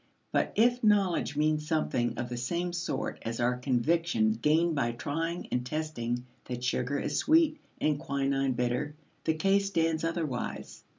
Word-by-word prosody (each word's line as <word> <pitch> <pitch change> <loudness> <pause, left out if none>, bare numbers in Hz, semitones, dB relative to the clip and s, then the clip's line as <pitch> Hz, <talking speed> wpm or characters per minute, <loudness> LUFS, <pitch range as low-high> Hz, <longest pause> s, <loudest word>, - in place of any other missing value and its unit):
But - - +1
if 240 +2 +3
knowledge 195 -8 +2
means 150 0 +1
something 155 -7 0
of 120 - -2
the 125 - -5
same 175 +8 -2
sort 175 0 -3
as 115 0 -4
our 125 +1 +2
conviction 125 -1 +1
gained 155 +9 +2
by 120 -5 0
trying 165 +9 -3
and 125 - 0
testing 125 -4 -3 0.2
that 125 -1 -5
sugar 130 +2 0
is 145 +1 -1
sweet 315 -1 +4 0.2
and 150 -2 +1
quinine 135 -1 0
bitter, 125 +4 -1 0.3
the 160 - +2
case 195 +4 +2
stands 165 -4 +1
otherwise. 165 -6 -3
150 Hz, 155 wpm, -30 LUFS, 125-170 Hz, 0.3 s, sweet